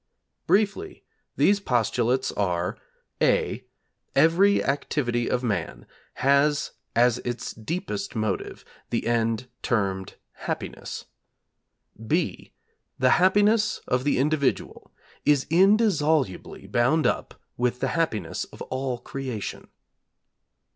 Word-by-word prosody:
Briefly, 215 - +1 0.3
these 205 0 +4
postulates 125 - +1
are, 90 -3 -1 0.5
(a), - - +2 0.5
every 190 +5 +4
activity 125 -3 -1
of 125 - 0
man 85 - -2 0.3
has 140 +2 +2 0.2
as 120 +1 +4
its 120 0 -4
deepest 180 - -4
motive 110 -3 -3 0.2
the - - -1
end 115 0 0
termed 95 -5 -1 0.3
Happiness, - - -5 1.0
(b) 160 +9 -1 0.5
the 130 0 +3
Happiness 205 +4 +4
of 125 0 +1
the 145 - +1
individual 140 0 -1 0.3
is 145 -2 +3
indissolubly 165 - +2
bound 130 +7 +2
up - - -1 0.2
with 125 0 0
the 135 - 0
Happiness 155 - -1
of - - -10
all 130 -1 -3
Creation. 125 -4 -6
130 Hz, 100 wpm, -25 LUFS, 120-165 Hz, 1.0 s, these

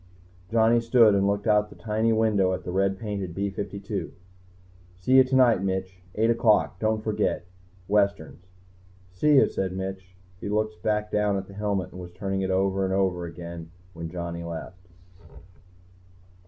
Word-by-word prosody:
Johnny 115 +1 +4
stood 115 -2 +5
and 100 0 +2
looked 100 +1 -1
out 105 -1 +3
the - - -14
tiny 110 +1 0
window 105 -4 +2
at 90 0 -4
the 90 - -5
red 95 +1 +1
painted 100 -6 -5
B 100 0 -2
52. 100 +1 -5 0.9
"See 95 +7 -4
you 130 - +9
tonight, 130 -5 +4
Mitch. 95 -1 -3
Eight 115 +2 +3
o'clock? 105 -8 +2
Don't 110 0 0
forget. 105 -5 -1 0.4
Westerns." 100 -4 0 0.6
"See 145 +11 +3
you," 135 - +6
said 95 -1 -3
Mitch. 95 0 -6 0.2
He 100 - -5
looked 110 +1 -1
back 105 0 -1
down 105 -1 +1
at 95 - -4
the 100 - -13
helmet 100 -3 -2
and 90 - -9
was 90 - -8
turning 95 +1 -3
it 95 - -1
over 95 +1 +1
and 95 0 0
over 95 -3 0
again 85 0 -8 0.2
when 85 -1 -6
Johnny 85 -1 -5
left. 85 +2 -8
100 Hz, 165 wpm, -26 LUFS, 95-110 Hz, 0.9 s, you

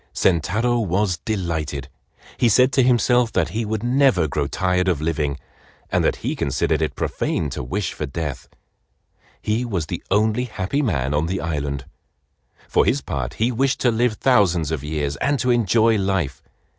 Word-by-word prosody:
Sentaro 110 +8 +1
was 95 -2 0
delighted. 80 - -3 0.5
He 120 - +3
said 125 +4 +4
to 130 - +4
himself 125 -1 +3
that - - +1
he 115 +1 -2
would 110 0 -3
never 125 - +3
grow 70 0 -1
tired 90 +4 0
of 90 -6 +1
living, 75 -3 -1 0.5
and - - +2
that - - +2
he - - -1
considered 70 - 0
it - - -1
profane 75 -3 -2
to - - -4
wish 90 +9 -3
for 75 - -4
death. 75 -1 -5 0.9
He 110 +3 0
was 95 -10 -2
the 85 +2 -5
only 110 +4 +2
happy 110 +4 -2
man 70 - 0
on 75 +2 +1
the 95 +2 -2
island. 70 -4 -3 0.8
For - - +3
his - - +1
part 65 -3 -4
he 115 +3 +1
wished 130 +3 0
to 120 - +3
live 120 +1 +1
thousands 95 - +2
of 75 -4 -3
years 75 -2 -2
and 140 - +1
to 125 -1 +1
enjoy 115 -1 +3
life. 95 -9 -1
95 Hz, 170 wpm, -22 LUFS, 75-115 Hz, 0.9 s, said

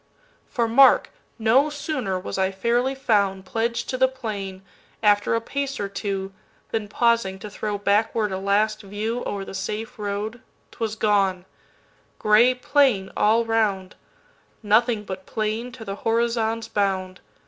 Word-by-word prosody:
For 235 -4 0
mark! 265 +4 +5 0.3
no 240 +6 +3
sooner 280 -10 -3
was 185 - -6
I 190 0 +2
fairly 240 +7 0
foundPledged 225 0 0
to 255 - -2
the 260 - +5
plain, 205 -7 -6 0.4
after 205 +1 +3
a 230 - 0
pace 275 +3 -3
or 200 - -1
two, 195 -1 -4 0.4
Than, 220 -2 -2
pausing 230 -3 +1
to 205 +2 -9
throw 210 0 -3
backward 210 +1 +1
a 190 - -2
last 205 +3 +1
viewO'er 205 0 -3
the - - -9
safe 220 +4 -5
road, 210 +3 -4 0.3
't - - -19
was 220 -2 -2
gone; 195 -4 +1 0.7
gray 225 +4 +5
plain 250 -7 +2
all 225 +2 +3
round:Nothing 220 - -1
but 190 -2 -7
plain 220 +3 -2
to 230 -3 -9
the 195 0 -5
horizon's 230 0 0
bound. 190 -2 -1
215 Hz, 135 wpm, -24 LUFS, 200-235 Hz, 0.7 s, mark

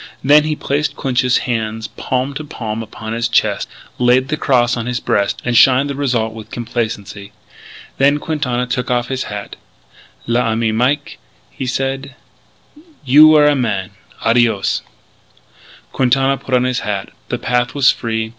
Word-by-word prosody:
Then 150 +3 +5
he 155 0 -1
placed 145 +1 -2
Clinch's 125 -2 +1
hands 110 -2 -2
palm 130 +3 -3
to 155 - -5
palm 115 -6 -5
upon 110 0 -7
his 115 0 -1
chest, 115 - 0 0.3
laid 125 +2 +3
the 155 - 0
cross 125 -5 +2
on 115 -1 -4
his 125 -1 -2
breast, 100 -3 0
and 125 -1 0
shined 135 +4 +5
the - - -5
result 125 -6 -1
with 110 -1 -10
complacency. 105 -4 -5 0.7
Then 140 +2 +4
Quintana 140 -6 -2
took 125 0 -3
off 120 -1 0
his 130 -1 -2
hat. 105 -1 -7 0.7
"L'ami 115 -1 0
Mike," 130 +6 -1 0.3
he 130 - -5
said, 135 +1 -3 0.9
"you 145 +4 +8
were 155 -1 +6
a 150 - +5
man!... 105 -8 -2 0.3
Adios!" 115 -4 +2 1.1
Quintana 135 +1 +2
put 135 -1 -2
on 125 - +3
his 125 -1 0
hat. 100 -2 -3 0.2
The - - -1
path 125 +2 -1
was 140 -1 +5
free. 110 -1 -3
125 Hz, 155 wpm, -17 LUFS, 115-135 Hz, 1.1 s, you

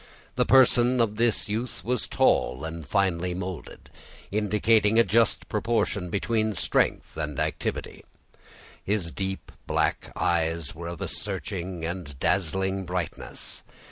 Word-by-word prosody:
The - - +1
person 125 -1 +5
of 110 -2 +1
this 115 -2 +2
youth 110 +4 -4
was 125 0 -1
tall 65 +4 +2
and 80 0 -5
finely 90 0 +1
molded, 90 -2 -7 0.4
indicating 105 +1 +3
a 115 - +8
just 110 +3 +2
proportion 105 -4 0
between 110 +3 0
strength - - 0
and 75 -3 -3
activity; - - -3 0.8
his 100 -5 -1
deep 95 +7 -4 0.2
black - - 0
eyes 80 -2 0
were 85 +2 -7
of 85 -2 -6
a - - -1
searching 90 -3 -4
and 85 -5 -5
dazzling 95 +2 +1
brightness. 90 -2 -4
95 Hz, 125 wpm, -27 LUFS, 85-110 Hz, 0.8 s, a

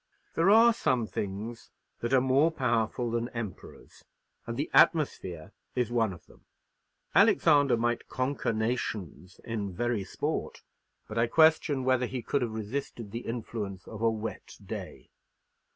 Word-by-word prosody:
There 165 +4 +3
are 230 +3 +7
some 125 - +1
things 105 +3 -5 0.3
that 120 - -3
are 135 - +6
more 135 +5 +4
powerful 120 -5 0
than 120 +1 -1
emperors, 110 -6 -8 0.4
and 115 0 -4
the 145 - -2
atmosphere 95 - +2 0.2
is 125 -2 0
one 115 -4 +2
of 85 -3 -11
them. - - -21 0.7
Alexander 145 -6 +5
might 120 +1 -1
conquer 130 -1 -1
nations 110 - -3
in 110 -4 -3
very 115 +1 -1
sport; 95 - -4 0.4
but 110 - -3
I 115 - +3
question 155 -1 +4
whether 130 -1 +2
he 125 -2 -5
could 140 - 0
have 120 - 0
resisted 110 -1 -5
the 115 +2 -6
influence 105 -5 -5
of 110 -1 -8
a 115 - +4
wet 110 0 -6
day. - - -8
120 Hz, 145 wpm, -29 LUFS, 110-130 Hz, 0.7 s, are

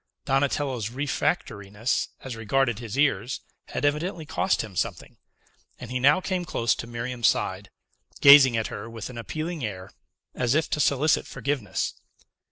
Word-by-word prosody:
Donatello's 135 -4 0
refractoriness 115 - -1 0.2
as 130 -3 -6
regarded 115 +1 0
his 120 +1 -6
ears 135 -4 +1 0.3
had - - -3
evidently 155 +3 -1
cost 185 +5 0
him 105 -4 -10
something, - - -3 0.6
and 125 -1 -8
he 125 - -1
now 145 +6 +5
came 185 -1 -2
close 120 -8 0
to 115 - -6
Miriam's 120 0 -1
side, - - -1 0.5
gazing 140 -4 +8
at 110 - 0
her 110 +3 -6
with 115 +1 -7
an 120 - -10
appealing 155 +5 -4
air, 95 -4 -5 0.4
as 125 +1 0
if 155 - +2
to 160 - 0
solicit 145 +1 +2
forgiveness. 130 -9 -2
130 Hz, 150 wpm, -26 LUFS, 115-145 Hz, 0.6 s, gazing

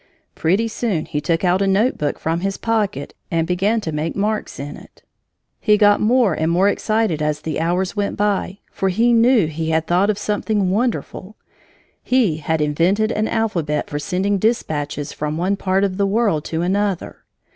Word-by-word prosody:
Pretty 190 +8 +1
soon 220 -7 -2
he 150 -2 -3
took 165 +3 0
out 180 +1 +2
a 195 - +2
notebook 195 - +1
from 165 +1 -1
his 195 +2 -2
pocket 210 - -1 0.2
and 165 -1 0
began 195 +6 +1
to 160 - -4
make 155 +2 -3
marks 210 +2 -2
in 145 +1 -6
it. - - -16 0.6
He 210 -2 +3
got 205 -1 +4
more 235 -3 +3
and 160 +1 -1
more 185 +4 +3
excited 215 -7 0
as 150 -1 -1
the 155 0 -3
hours 180 +5 -1
went 205 -1 -2
by, 200 -2 0
for 195 - -1
he 230 +6 +2
knew 230 -3 +4
he 160 +1 -3
had 160 0 +1
thought 180 +5 +2
of 210 - +1
something 205 -2 -1
wonderful. 215 -2 -2 0.7
He 240 -11 +2
had 160 +1 -1
invented 175 +9 +1
an 215 0 0
alphabet 170 -9 -1
for 145 - -2
sending 190 +6 -1
dispatches 150 -10 -1
from 150 +1 -3
one 185 +4 0
part 195 0 0
of 190 -2 -1
the 200 -1 +2
world 200 -7 +1
to 165 +1 -2
another! 195 0 -1
190 Hz, 180 wpm, -20 LUFS, 160-210 Hz, 0.7 s, got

